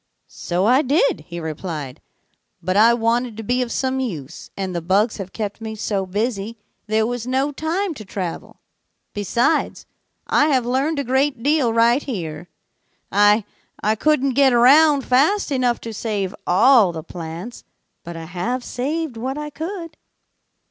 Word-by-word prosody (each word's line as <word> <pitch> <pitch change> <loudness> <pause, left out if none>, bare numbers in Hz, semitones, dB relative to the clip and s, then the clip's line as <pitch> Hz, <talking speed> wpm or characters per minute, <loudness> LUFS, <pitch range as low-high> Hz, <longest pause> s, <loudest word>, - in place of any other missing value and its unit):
'So 180 +3 -2
I 255 +5 +5
did,' 330 - +1
he 170 0 -6
replied, 155 -4 -6 0.6
'but 185 +2 -2
I 220 +3 +6
wanted 235 0 0
to 225 - -6
be 245 +4 0
of 245 -2 -3
some 265 +1 -1
use, 165 - -6
and 190 -2 -3
the 170 - -2
bugs 200 +6 +1
have 190 -2 -7
kept 210 0 -5
me 220 -1 -5
so 200 -3 -2
busy 215 +2 -2 0.3
there 220 +1 +2
was 245 0 -4
no 265 +3 0
time 330 +6 -2
to 225 - -9
travel. 190 -3 -6 0.5
Besides, 235 - 0 0.4
I 295 - +3
have 260 -5 +2
learned 270 +6 0
a 280 - 0
great 265 -1 0
deal 290 -4 +2
right 235 +4 +3
here. 175 - -6 0.6
I 205 +1 +4 0.4
I 215 - +3
couldn't 275 +2 +1
get 270 0 +4
around 280 +4 +6
fast 300 +9 +2
enough 250 -3 +1
to 230 - -6
save 205 -3 -3
all 220 +1 +5
the 160 -2 -7
plants, 170 +8 -8 0.4
but 170 0 -8
I 165 - -7
have 205 +9 -3
saved 280 +2 -3
what 260 +4 -3
I 300 0 -5
could.' 330 0 -6
235 Hz, 160 wpm, -21 LUFS, 195-275 Hz, 0.6 s, I